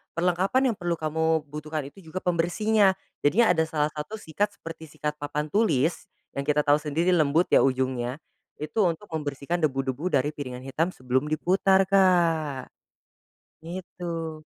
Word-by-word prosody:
perlengkapan 190 +9 +2
yang - - -5
perlu 175 -1 -1
kamu 160 0 0
butuhkan 155 0 -4
itu 195 - -17
juga 185 +4 -5
pembersihnya, 190 +4 +2 0.2
jadi 185 +8 +4
ada 160 -2 +2
salah 150 -1 0
satu 150 +9 -6
sikat 205 +2 -2
seperti 160 -3 -9
sikat 150 +1 -4
papan 150 +1 -3
tulis, 165 - +1 0.3
yang 140 0 -4
kita 150 0 +3
tahu 145 +1 +4
sendiri 160 +4 0
lembut 160 0 +3
ya, - - +7
ujungnya. 130 -1 0 0.4
Itu 155 +6 0
untuk 170 +4 -4
membersihkan 150 +2 -3
debu-debu 135 +3 -3
dari 145 +3 +1
piringan 130 -4 -7
hitam 155 +6 0
sebelum 130 +3 -1
diputar 190 +4 +3
Kak, 170 -8 +2 0.9
gitu. 170 -3 -6
160 Hz, 145 wpm, -26 LUFS, 145-180 Hz, 0.9 s, ya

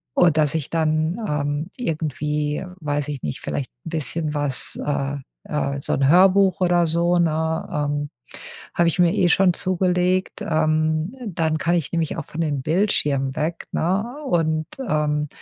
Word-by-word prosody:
und 170 -3 +4
dass 150 0 +2
ich 155 -4 -2
dann, 160 +1 +1
ähm, 145 0 -1
irgendwie, 150 - -2 0.2
weiß 145 -2 -2
ich 140 -3 -4
nicht, 75 - -4
vielleicht 135 - -4
'n - - -5
bisschen 155 0 -1
was, 145 -3 -1
äh, 140 -1 -1 0.3
äh 70 -1 -2
so - - -1
'n 135 - +2
Hörbuch 190 +2 +5
oder 175 -1 +3
so, 170 +2 +2
ne 160 -1 0
ähm, 145 0 -1 0.7
habe 170 -1 +4
ich 175 - -4
mir 175 -1 +4
eh 175 - +3
schon 185 +1 +4
zugelegt. 180 +1 +1
Ähm, 155 +5 +1
dann 160 -4 0
kann 170 +2 +1
ich 165 -5 -1
nämlich 165 -2 -1
auch - - -4
von 165 - -5
den 145 -4 -1
Bildschirmen 145 -6 +1
weg, 165 +2 -2
ne, 185 +5 +1 0.2
und, 160 -5 +1 0.2
ähm, 150 -2 0
155 Hz, 160 wpm, -22 LUFS, 150-175 Hz, 0.7 s, Hörbuch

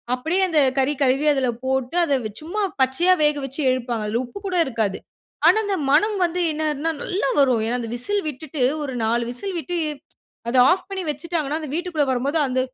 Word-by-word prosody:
அப்படியே 320 +9 -1
அந்த 315 -2 +3 0.2
கறி 270 +2 +2
கழுவி 270 +3 +2
அதில 265 -2 0 0.2
போட்டு 265 +3 -1
அத 290 - 0 0.3
சும்மா 360 +7 -3 0.2
பச்சையா 300 +8 +4
வேக 295 0 +3
வெச்சு 270 +3 -5
எடுப்பாங்க 240 -4 -2
அதில 230 +4 0
உப்பு 245 +11 -9
கூட 370 - -2
இருக்காது. 220 -6 -1 0.5
ஆனா - - +6
அந்த 400 -2 -1
மணம் 415 +8 +3
வந்து 350 +1 -2
என்னதுனா, 305 +1 -1
நல்லா 365 -7 -1
வரும். 250 -5 +3
ஏன்னா 245 +2 -1
அந்த 230 - -5
விசில் 405 +12 -1
விட்டுட்டு 300 0 -6 0.2
ஒரு 270 - -4
4 235 +2 +1
விசில் 370 +9 -4
விட்டு, 350 +2 -4 0.7
அத 255 - +1
ஆஃப் 370 +1 -1
பண்ணி 385 -1 -4
வெச்சுட்டாங்கன்னா 310 0 -3
அந்த 295 -3 -6
வீட்டிகுள்ள 340 -4 0
வரும்போது 275 +6 0
அந்த 255 0 0
290 Hz, 185 wpm, -22 LUFS, 255-345 Hz, 0.7 s, ஆனா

